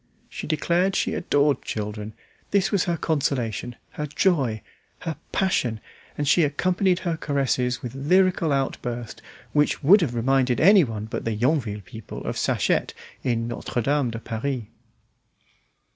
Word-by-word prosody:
She - - -6
declared 175 +4 +1
she - - 0
adored 145 -4 +2
children; 105 0 -5 0.4
this 200 -2 +2
was 200 -4 +2
her 170 -1 0
consolation, 125 -7 -1 0.2
her 150 - -4
joy, 140 - +1 0.4
her 165 -2 -3 0.2
passion, 125 - 0 0.4
and 145 - -1
she 170 - +5
accompanied 180 +5 +1
her 170 -2 -1
caresses 130 -4 0
with 125 -1 -5
lyrical 175 +3 +2
outburst 120 -4 -3 0.3
which 150 +1 +2
would 190 +8 +7
have 130 -8 -1
reminded 125 +1 +2
anyone 155 - +4
but 110 - -5
the 115 -1 -1
Yonville 120 -3 0
people 110 +4 -9
of - - -3
Sachette - - 0 0.3
in 115 -3 0
"Notre 120 +1 -3
Dame 140 0 +1
de 115 - -5
Paris." 115 +3 -3
140 Hz, 140 wpm, -24 LUFS, 115-165 Hz, 0.4 s, would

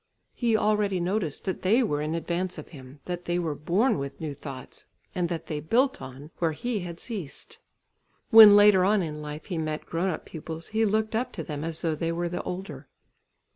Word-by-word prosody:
He 230 -3 +1
already 210 -3 +1
noticed 175 -3 -2
that 190 - -3
they 225 +7 +3
were 150 -9 -1
in 155 +2 -2
advance 175 +2 -2
of - - -9
him, 135 -2 -12
that 175 0 -5
they 175 0 0
were 165 -4 -1
born 175 - +1
with 140 0 -6
new 155 -3 -4
thoughts, 135 -2 -10 0.3
and 180 -3 -1
that 165 -2 -4
they 150 -2 -4
built 255 - +1
on, 135 +4 -10
where 165 -2 +1
he 235 +7 -2
had 170 -2 -7
ceased. 195 - -8 0.7
When 220 -2 +11
later 205 -2 +7
on 200 0 +3
in 150 -2 -5
life, 150 0 -7
he 175 -5 -3
met 155 -1 -3
grown 170 +3 -1
up 160 - -4
pupils, 160 0 -8
he 220 +1 +1
looked 220 +1 0
up 245 +3 -1
to 165 - -5
them 150 -1 -5
as 165 +1 -5
though 165 -2 +1
they 165 +2 -2
were 170 +1 -2
the 175 - -3
older. 190 +2 -6
175 Hz, 210 wpm, -27 LUFS, 155-205 Hz, 0.7 s, When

